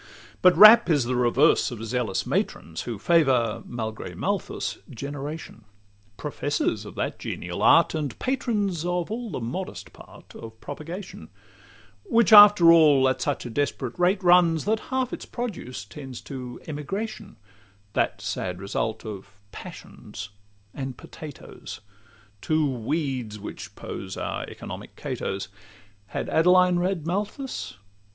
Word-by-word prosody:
But 180 -2 +6
Rapp 215 +2 +9
is 145 -5 +3
the 125 +2 -1
reverse 125 +7 +3
of 115 -3 -7
zealous 115 -4 -1
matrons, - - -2
Who 115 -3 -4
favour, 125 - +2
malgre 110 -2 -5
Malthus, - - -3
generation— 140 -1 -7 0.5
Professors - - -2
of - - -11
that - - -3
genial - - -5
art, - - +5
and 150 -6 -3
patrons 210 - -1
Of 175 +1 -2
all 235 +1 -4
the - - -4
modest 125 +11 -6
part - - -15
of 110 -1 -11
propagation; 155 - -8 0.7
Which 230 -3 +3
after 205 -5 +10
all 145 -5 +6
at 130 -1 0
such 145 0 -1
a 120 - -6
desperate 135 -1 -2
rate 185 +2 +2
runs, 175 -3 +5
That 220 +1 +1
half 260 -1 -1
its - - -6
produce 190 - -5
tends 130 +3 -9
to 125 -3 -8
emigration, 195 +8 -5 0.6
That - - 0
sad 90 -1 -3
result 105 +4 -3
of 100 -1 -8
passions 100 +1 -9 0.4
and 130 -3 -5
potatoes— 150 -4 -10 0.6
Two 155 -1 +1
weeds 130 -3 -2
which 105 - -9
pose - - -7
our - - -3
economic - - -9
Catos. 95 0 -4 0.6
Had - - -4
Adeline 180 +2 +4
read 180 -3 -1
Malthus? 205 - -4
150 Hz, 130 wpm, -25 LUFS, 120-180 Hz, 0.7 s, after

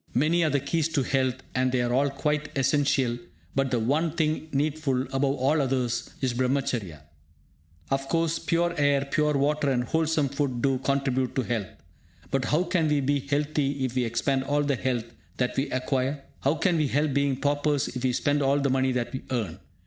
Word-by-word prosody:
Many 160 +7 +3
are 155 - +2
the 145 - +2
keys 155 +3 0
to 140 - +2
health, 130 -1 +1 0.2
and 130 0 +1
they 130 - +1
are 120 0 0
all 140 +3 +3
quite 150 +2 -1
essential; 135 -3 +2 0.3
but 135 0 +1
the 125 - +1
one 145 +8 +1
thing 155 -1 0
needful, 145 -2 0
above 135 +1 +1
all 140 +4 +2
others, 125 -3 -1
is 130 -3 0
Brahmacharya. 120 - -1 0.9
Of 135 0 -1
course, 165 -1 +1
pure 170 +1 +1
air, 140 -1 +3
pure 150 +2 +1
water, 145 +1 +1
and 125 -2 +1
wholesome 160 +1 +1
food 140 -3 -1
do 135 -2 +2
contribute 135 -2 0
to 130 - +1
health. 115 -6 -2 0.6
But 135 -2 +1
how 155 +9 +2
can 175 -3 +1
we 150 -1 +2
be 140 +1 +1
healthy 140 -1 -1
if 125 - -3
we 130 -1 +1
expend 130 +3 0
all 145 +1 +1
the 140 -1 +1
health 125 -2 -1 0.3
that 125 -1 0
we 135 - 0
acquire? 130 +2 -1 0.2
How 140 +4 +1
can 175 +2 +1
we 155 -2 +2
help 145 +2 +1
being 140 -1 +2
paupers 145 0 +1
if 125 0 -6
we 130 - +2
spend 145 +4 +1
all 140 +1 +3
the 140 -1 +1
money 130 0 +2
that 125 0 -2
we 130 - -4
earn? 115 -10 -2
140 Hz, 195 wpm, -26 LUFS, 130-150 Hz, 0.9 s, Many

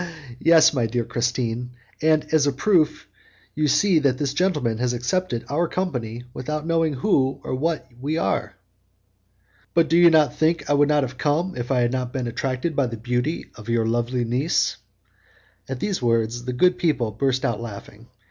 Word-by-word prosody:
"Yes, 160 -1 +5
my 120 -5 +1
dear 120 +1 -1
Christine, 120 +1 -2 0.3
and 155 -1 +3
as 150 -2 +4
a - - +3
proof 155 +3 +1 0.5
you 150 0 0
see 180 +3 +3
that 140 -4 +1
this 140 -1 -2
gentleman 145 - 0
has 125 0 0
accepted 125 +1 -2
our 170 +4 0
company 125 -11 -3
without 150 +4 -4
knowing 165 -2 +1
who 135 -3 +1
or - - -4
what 155 +1 -1
we 150 +4 -1
are." 105 -10 -1 1.2
"But 165 -2 +3
do 165 - +4
you 175 0 +8 0.2
think 160 +5 0
I - - +2
would 145 0 +3
have 135 -4 0
come 165 +5 0
if 120 0 -5
I 130 -2 +2
had 120 0 +1
not 125 -1 -3
been 130 -2 -2
attracted 130 +6 -2
by 140 -3 +2
the 115 -1 -6
beauty 125 +7 -2
of 110 0 -11
your 115 -1 +1
lovely 120 +2 0
niece?" 130 +8 0 0.9
At 135 -2 -4
these 195 0 -2
words 115 0 0
the 125 - -3
good 180 +9 +3
people 130 -10 0
burst 130 +4 0
out 115 -2 -1
laughing. 110 0 -9
130 Hz, 175 wpm, -23 LUFS, 120-155 Hz, 1.2 s, you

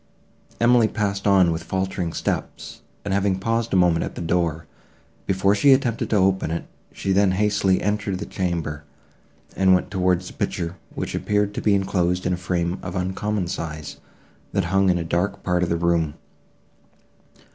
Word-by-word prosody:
Emily 120 -1 +5
passed 100 -2 -2
on 95 -3 +5
with 80 0 -2
faltering 95 -2 -2
steps, - - -4 0.2
and 100 - -1
having 100 -1 +1
paused 115 +3 -1
a - - +1
moment 90 -3 +3
at - - -6
the - - -5
door, 85 -2 0 0.6
before 95 +1 +2
she 135 +7 +5
attempted 125 -4 0
to - - +1
open 95 -3 +2
it, 85 +1 -3 0.3
she 95 - -3
then 95 -1 +3
hastily 100 -1 +2
entered 105 -1 -1
the 100 - -5
chamber, 85 -5 -3 0.7
and 95 -1 +5
went 90 - -2
towards 90 -2 +1
the - - -9
picture, 85 +1 -3 0.2
which - - -4
appeared 105 0 0
to - - -4
be 105 -2 +3
enclosed 90 -2 0
in 90 - +1
a - - -1
frame 85 0 -2
of 95 0 -6
uncommon 95 +2 -1
size, 80 -4 -5 0.6
that - - +1
hung 95 0 +4
in 90 - +3
a 85 - -2
dark 90 +5 -1
part 90 -1 +1
of 90 - 0
the 85 - +1
room. 85 -3 +1
95 Hz, 175 wpm, -23 LUFS, 85-100 Hz, 0.7 s, Emily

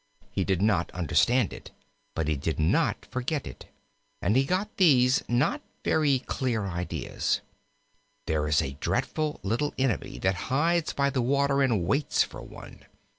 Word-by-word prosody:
He 95 - -1
did 95 0 0
not 105 -6 +2
understand 100 - +2
it, - - -10 0.5
but 80 -2 -1
he 75 - +1
did 80 +3 -3
not 80 +1 +1
forget 130 +3 -2
it, 65 - -9 0.5
and 100 +5 +1
he 135 +1 +4
got 190 +7 -2
these 130 -8 +5
not 120 +4 +1 0.2
very 145 -4 +3
clear 125 -4 -2
ideas: 85 -6 -2 0.8
"There 75 -1 0
is 75 0 +3
a 65 +1 -5
dreadful 155 -1 -1
little 120 +9 -1
enemy 130 -4 -1
that 95 0 +1 0.2
hides 165 +5 +2
by 140 0 +1
the 130 -2 0
water 140 +2 +2
and 115 -10 +2
waits 140 - +2
for - - -9
one. - - -12
125 Hz, 155 wpm, -27 LUFS, 90-140 Hz, 0.8 s, these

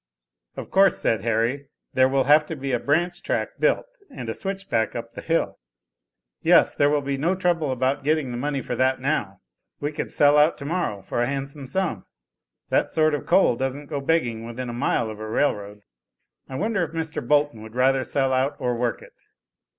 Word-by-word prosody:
"Of - - -7
course," 195 0 +5
said 110 -3 0
Harry, 115 +5 0 0.3
"there 130 0 +4
will 135 0 +2
have 150 +2 +5
to 160 - -4
be 135 -1 -4
a 125 - +1
branch 170 +7 0
track - - -2
built, - - +2 0.2
and 125 - -7
a - - -1
'switch 195 - -5
back' 110 -1 0
up 115 -1 -5
the - - -8
hill." 165 0 -1 0.8
"Yes, - - +5
there 145 - +3
will 145 -1 +1
be 135 0 -2
no 170 +6 +1
trouble 175 -6 0
about 130 +2 0
getting 150 -3 +1
the 120 - -4
money 140 0 -2
for - - -3
that 130 0 +2
now. 105 -9 -2 0.4
We 145 +1 -2
could 150 - -5
sell 145 0 +5
out 150 +3 +4
tomorrow 140 - -3
for 120 - -2
a 120 - +1
handsome 140 0 -5
sum. 135 - -2 0.6
That - - +2
sort 155 -1 +2
of 145 - -3
coal 175 -7 +4
doesn't 135 +3 -3
go 140 -2 -2
begging 130 -7 0
within 120 +2 -6
a - - -5
mile 120 -2 0
of 105 - -10
a 110 - -5
rail 145 +6 +2
road. 105 0 -10 0.7
I 130 - -6
wonder 205 +3 0
if 165 - -5
Mr. 160 -1 -3
Bolton 145 -5 +2
would 110 +1 -11
rather 130 +1 +3
sell 135 +2 0
out 135 +3 +1
or 125 -3 -1
work 120 0 -2
it?" - - -16
135 Hz, 205 wpm, -24 LUFS, 120-155 Hz, 0.8 s, course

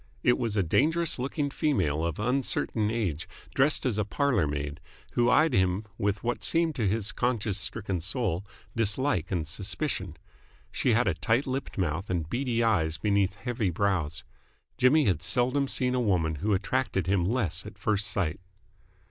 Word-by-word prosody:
It 125 - +3
was 115 -4 -1
a 100 - +3
dangerous 155 - +1
looking 140 +2 -2
female 90 - 0
of 85 -2 -2
uncertain 120 -2 0
age, 95 -9 -2 0.2
dressed 135 +2 +3
as 115 -5 0
a - - +2
parlour 125 - +1
maid, 70 +1 -4 0.3
who 120 0 +3
eyed 155 +3 +4
him 95 +1 +2
with 100 0 -1
what 120 +1 -2
seemed 165 -1 +2
to 110 -5 +1
his 105 +1 0
conscience 115 -5 -1
stricken 95 -5 -4
soul 95 -1 -1 0.3
dislike 115 - +1
and 85 -5 -2
suspicion. 95 - -3 0.5
She 125 - +1
had 120 +3 +3
a 95 - +3
tight 115 - +1
lipped 135 0 -4
mouth 90 +1 -1
and 85 -4 -1
beady 120 +2 0
eyes 80 -8 +2
beneath 100 +2 +1
heavy 115 -4 -2
brows. 85 -4 -1 0.5
Jimmy 140 +5 +4
had 90 -7 +1
seldom 130 +3 +1
seen 125 -1 0
a 125 - +1
woman 85 -8 +1
who 105 +8 -1
attracted 105 0 -1
him 95 -1 +2
less 100 -2 -1
at - - -11
first 105 -1 0
sight. 90 -7 -1
105 Hz, 165 wpm, -28 LUFS, 90-125 Hz, 0.5 s, eyed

